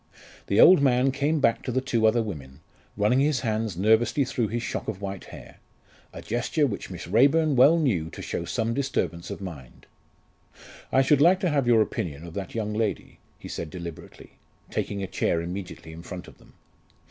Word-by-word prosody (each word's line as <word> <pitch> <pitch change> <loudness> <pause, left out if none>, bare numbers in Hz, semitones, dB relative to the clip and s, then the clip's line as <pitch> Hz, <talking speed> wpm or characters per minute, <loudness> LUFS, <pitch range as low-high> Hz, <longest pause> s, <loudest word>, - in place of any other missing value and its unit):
The 100 - +1
old 180 -4 +8
man 130 -1 +3
came 145 +3 0
back 115 -4 +2
to 125 - -4
the 130 - +1
two 115 -4 +1
other 115 +1 +2
women, 70 -11 -8 0.4
running 105 +5 +3
his 140 -2 +1
hand 110 -5 -2
nervously 110 +7 +3
through 125 -3 -1
his 115 +3 -3
shock - - -4
of 95 - -4
white 100 -1 -6
hair - - -13 0.5
a - - -10
gesture 120 +6 0
which 105 -8 -4
Miss 90 -2 -7
Raeburn 140 - +3
well 140 +7 +6
knew 100 - 0
to - - -9
show - - -3
some 115 +6 -2
disturbance 95 - -2
of - - -7
mind. 75 -10 -10 1.1
"I 135 - +4
should 145 +1 +3
like 180 +4 +5
to 180 -5 +1
have 140 -4 +1
your 115 -2 +5
opinion 80 -6 -5
of 85 - -10
that 100 +3 -6
young 105 -2 -2
lady," 110 -1 -3 0.2
he - - -10
said 80 - -5
deliberately, 85 -2 -10 0.3
taking 100 -1 -3
a - - -3
chair 85 - 0
immediately 90 -1 -7
in 80 - -9
front 90 0 -8
of - - -16
them. - - -21
110 Hz, 195 wpm, -26 LUFS, 90-135 Hz, 1.1 s, old